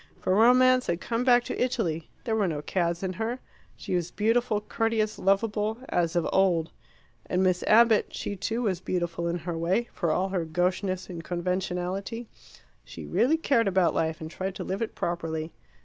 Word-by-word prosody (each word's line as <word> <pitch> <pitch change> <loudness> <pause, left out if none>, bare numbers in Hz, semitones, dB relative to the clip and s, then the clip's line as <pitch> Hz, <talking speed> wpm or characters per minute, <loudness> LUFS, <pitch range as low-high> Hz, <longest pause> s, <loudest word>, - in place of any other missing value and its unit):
For 185 - 0
romance 255 +4 +5
had 170 0 0
come 230 +4 -2
back 245 -1 +5
to - - -2
Italy; 170 -11 -2
there 225 -3 -1
were 210 -3 +2
no 150 -3 -3
cads 170 +2 -1
in 185 -1 -2
her; 235 +3 -1 0.4
she - - -6
was 175 -1 0
beautiful, 225 +2 +1
courteous, 220 0 -1
lovable, 210 +2 +1
as 175 -1 0
of 170 - +1
old. 175 -4 +2 0.6
And 185 +1 +1
Miss 185 -1 +2
Abbott 225 -1 +5
she, 205 - -4
too, 225 +5 -2
was 190 -6 0
beautiful 175 -2 -2
in 170 +1 -1
her 170 0 -5
way, 185 +9 0
for 170 - -1
all 185 +5 +1
her 185 -3 -1
gaucheness 180 +3 -1
and 170 -3 -7
conventionality. 185 +5 -3 0.6
She - - -9
really 280 +7 +2
cared 255 -8 +2
about 185 -3 +3
life, 160 -1 -1
and 160 0 -7
tried 190 +1 -4
to - - -5
live 190 +3 -3
it 230 - -3
properly. 165 -2 -3
190 Hz, 180 wpm, -27 LUFS, 175-225 Hz, 0.6 s, romance